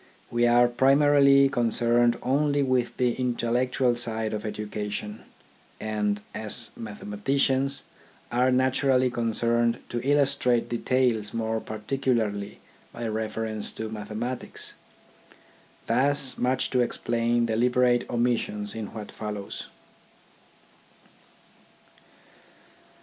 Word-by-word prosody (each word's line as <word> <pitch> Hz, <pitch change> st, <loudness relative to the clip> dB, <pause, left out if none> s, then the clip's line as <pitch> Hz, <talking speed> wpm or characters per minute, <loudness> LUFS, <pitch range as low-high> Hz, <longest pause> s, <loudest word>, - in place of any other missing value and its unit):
We 120 Hz, 0 st, +3 dB
are 120 Hz, +1 st, +5 dB
primarily 140 Hz, +2 st, +5 dB
concerned 120 Hz, -1 st, +2 dB
only 145 Hz, +2 st, +2 dB
with 130 Hz, -2 st, 0 dB
the 125 Hz, -2 st, +2 dB
intellectual 125 Hz, 0 st, 0 dB
side 115 Hz, -2 st, -1 dB
of 105 Hz, +1 st, -3 dB
education, 105 Hz, 0 st, -5 dB, 0.5 s
and, 105 Hz, -1 st, -1 dB
as 110 Hz, +2 st, -1 dB
mathematicians, 130 Hz, +6 st, -1 dB, 0.5 s
are 125 Hz, +2 st, +3 dB
naturally 130 Hz, 0 st, +2 dB
concerned 115 Hz, 0 st, +1 dB
to 120 Hz, -, -2 dB
illustrate 140 Hz, -3 st, +2 dB
details 120 Hz, -3 st, 0 dB
more 110 Hz, 0 st, -1 dB
particularly 110 Hz, -2 st, -2 dB, 0.3 s
by 120 Hz, -1 st, -5 dB
reference 110 Hz, 0 st, -2 dB
to 110 Hz, 0 st, -5 dB
mathematics. 110 Hz, +4 st, -5 dB, 1.1 s
Thus 135 Hz, +3 st, +1 dB
much 125 Hz, +1 st, 0 dB
to 130 Hz, -, +2 dB
explain 120 Hz, 0 st, +1 dB
deliberate 120 Hz, +2 st, +2 dB
omissions 115 Hz, -4 st, -1 dB
in 110 Hz, -2 st, -5 dB
what 105 Hz, -2 st, -7 dB
follows. 105 Hz, -2 st, -6 dB
120 Hz, 90 wpm, -26 LUFS, 110-130 Hz, 1.1 s, are